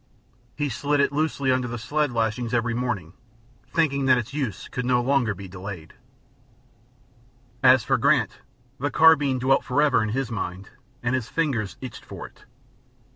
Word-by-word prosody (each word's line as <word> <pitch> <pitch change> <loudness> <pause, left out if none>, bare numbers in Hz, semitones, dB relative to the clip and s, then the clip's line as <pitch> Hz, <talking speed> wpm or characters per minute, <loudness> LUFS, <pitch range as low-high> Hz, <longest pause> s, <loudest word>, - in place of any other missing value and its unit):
He 145 -1 -1
slid 145 +3 -1
it 140 - +3
loosely 145 -3 0
under 130 -1 +1
the 120 0 -5
sled 150 +4 -1
lashings 115 +1 -1
every 120 0 0
morning, 115 -9 -3 0.6
thinking 140 -4 +1
that 130 -1 +6
its 120 +2 -4
use 135 -9 -3
could 125 - -4
not 125 -1 +1
long 135 -4 +2
be 95 +1 -9
delayed. 90 -2 -8 1.7
As 130 -2 +6
for - - +1
Grant, - - +2 0.4
the 145 +3 0
carbine 145 -5 +5
dwelt 130 +2 +2
forever 140 -2 +2
in 110 - -1
his 125 +1 -2
mind, 95 -3 -5 0.3
and 120 +2 0
his 125 -3 -2
fingers 120 - -1
itched 130 -3 -8
for - - -8
it. - - -16
125 Hz, 160 wpm, -24 LUFS, 115-140 Hz, 1.7 s, that